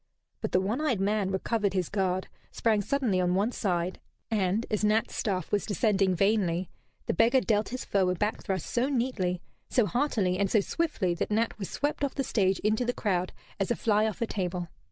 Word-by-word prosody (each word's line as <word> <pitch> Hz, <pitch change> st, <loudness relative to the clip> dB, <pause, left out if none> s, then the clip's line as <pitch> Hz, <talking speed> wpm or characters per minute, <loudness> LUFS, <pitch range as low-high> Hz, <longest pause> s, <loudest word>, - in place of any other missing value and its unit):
But -, -, -2 dB
the -, -, +4 dB
one 210 Hz, +9 st, -1 dB
eyed 265 Hz, -10 st, +1 dB
man 200 Hz, 0 st, +1 dB
recovered 200 Hz, +1 st, 0 dB
his 180 Hz, -3 st, +1 dB
guard, 190 Hz, -2 st, -1 dB, 0.2 s
sprang 220 Hz, -3 st, +1 dB
suddenly 225 Hz, -5 st, +1 dB
on 180 Hz, 0 st, +1 dB
one 205 Hz, +5 st, +1 dB
side, 180 Hz, -5 st, -1 dB, 0.3 s
and, 205 Hz, +1 st, +1 dB
as 215 Hz, -1 st, 0 dB
Nat's 215 Hz, +1 st, +2 dB
staff 190 Hz, -5 st, -2 dB
was 205 Hz, -, +1 dB
descending 195 Hz, -2 st, +2 dB
vainly, 190 Hz, -3 st, +1 dB, 0.3 s
the -, -, 0 dB
beggar 230 Hz, +8 st, +4 dB
dealt 215 Hz, -4 st, +1 dB
his 255 Hz, +1 st, -5 dB
foe 190 Hz, -2 st, +2 dB
a 180 Hz, -, +1 dB
back 210 Hz, +5 st, -1 dB
thrust 190 Hz, -5 st, -2 dB
so 250 Hz, +3 st, 0 dB
neatly, 230 Hz, -9 st, -1 dB, 0.3 s
so 245 Hz, -, +3 dB
heartily, 205 Hz, -, 0 dB
and 200 Hz, -1 st, +2 dB
so 215 Hz, -, +4 dB
swiftly 210 Hz, -, 0 dB
that 170 Hz, -, -2 dB
Nat 220 Hz, +2 st, +1 dB
was 195 Hz, -, -4 dB
swept 290 Hz, 0 st, -2 dB
off 280 Hz, -, -1 dB
the 275 Hz, -, 0 dB
stage 195 Hz, -6 st, +1 dB
into 215 Hz, +3 st, +1 dB
the 245 Hz, 0 st, 0 dB
crowd 185 Hz, -6 st, -1 dB, 0.3 s
as 195 Hz, -, 0 dB
a 240 Hz, -, +2 dB
fly 215 Hz, -1 st, +2 dB
off 220 Hz, +1 st, -2 dB
a -, -, +1 dB
table. 180 Hz, -4 st, -3 dB
205 Hz, 205 wpm, -28 LUFS, 185-230 Hz, 0.3 s, the